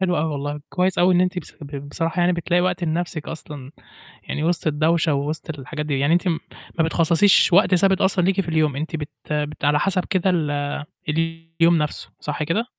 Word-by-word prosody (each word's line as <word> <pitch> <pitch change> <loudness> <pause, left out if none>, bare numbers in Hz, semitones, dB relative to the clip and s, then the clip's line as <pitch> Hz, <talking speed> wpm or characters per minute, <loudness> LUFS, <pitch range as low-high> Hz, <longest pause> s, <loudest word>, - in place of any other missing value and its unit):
حلو 180 -2 +1
أوي 160 - +1
والله. 145 +1 -4
كويّس 185 0 0
أوي 180 +1 +4
إن 175 - +4
أنتِ 180 0 +1
بص - - -9
ب 140 -1 -7
بصراحة 165 +4 -2
يعني 175 +1 +3
بتلاقي 175 +1 +1
وقت 180 0 0
لنَفْسِك 165 -1 -3
أصلًا، 150 -4 -8 0.5
يعني 150 - -4
وِسط 170 0 0
الدوشة، 155 +1 +2
ووِسط 150 +2 -3
الحاجات 150 +3 -5
دي. 140 -3 -1
يعني 145 +4 +3
أنتِ 175 +2 +2
م 165 -3 +1 0.4
ما - - +5
بتخصّصيش 170 +4 +4
وقت 190 0 +5
ثابت 190 +1 +3
أصلًا 190 -1 +2
ليكِ 195 +2 +2
في 170 - -5
اليوم، 155 -3 +1
إن 140 - -3
أنتِ 160 +1 -4
بت 150 -2 -5 0.2
بت 150 -1 -2
على 145 0 +3
حَسَب 185 +1 0
كده 190 -3 +1
ال 145 -5 -1 0.4
اليوم 165 +1 +1
نَفْسه، 150 -1 -3
صح 150 +1 -3
كده؟ 170 +10 0
165 Hz, 205 wpm, -22 LUFS, 150-180 Hz, 0.5 s, ما